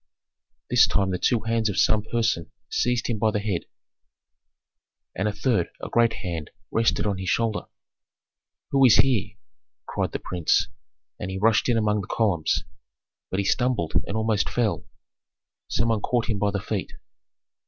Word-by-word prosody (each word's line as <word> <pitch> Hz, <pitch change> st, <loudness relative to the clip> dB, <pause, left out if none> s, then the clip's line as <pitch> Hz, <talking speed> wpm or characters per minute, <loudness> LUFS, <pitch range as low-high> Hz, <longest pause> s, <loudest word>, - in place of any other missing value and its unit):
This -, -, +6 dB
time 95 Hz, -2 st, +1 dB
the 90 Hz, -, -2 dB
two 120 Hz, +2 st, +2 dB
hands 115 Hz, 0 st, 0 dB
of 100 Hz, -, -3 dB
some 110 Hz, -1 st, +3 dB
person 110 Hz, -6 st, -1 dB, 0.2 s
seized 125 Hz, -1 st, +1 dB
him 115 Hz, -3 st, -2 dB
by 110 Hz, -, +3 dB
the 105 Hz, -1 st, 0 dB
head, 100 Hz, -4 st, -2 dB, 1.5 s
and 95 Hz, -, 0 dB
a -, -, +1 dB
third, 105 Hz, -6 st, 0 dB
a -, -, -6 dB
great 115 Hz, -1 st, +3 dB
hand, 80 Hz, -4 st, -4 dB, 0.2 s
rested 115 Hz, -1 st, +1 dB
on 100 Hz, -2 st, -1 dB
his 95 Hz, -, -3 dB
shoulder. 115 Hz, -2 st, 0 dB, 1.0 s
"Who 135 Hz, -1 st, +4 dB
is 125 Hz, -4 st, +8 dB
here?" 110 Hz, -6 st, +2 dB, 0.5 s
cried -, -, -2 dB
the -, -, -2 dB
prince; 90 Hz, -3 st, 0 dB, 0.5 s
and 90 Hz, -, -4 dB
he 95 Hz, -, -4 dB
rushed 110 Hz, +4 st, +3 dB
in 120 Hz, -, +3 dB
among 105 Hz, -1 st, +1 dB
the -, -, -8 dB
columns. 95 Hz, -9 st, +1 dB, 0.7 s
But 95 Hz, -, 0 dB
he -, -, -4 dB
stumbled 120 Hz, -8 st, 0 dB
and 105 Hz, -, -2 dB
almost 110 Hz, -1 st, +1 dB
fell: 115 Hz, -4 st, -1 dB, 0.8 s
some 115 Hz, -, 0 dB
one 110 Hz, -2 st, +1 dB
caught 120 Hz, 0 st, 0 dB
him 105 Hz, -, -2 dB
by 105 Hz, -, +2 dB
the 100 Hz, 0 st, -2 dB
feet. 105 Hz, -2 st, -4 dB
105 Hz, 165 wpm, -25 LUFS, 100-115 Hz, 1.5 s, is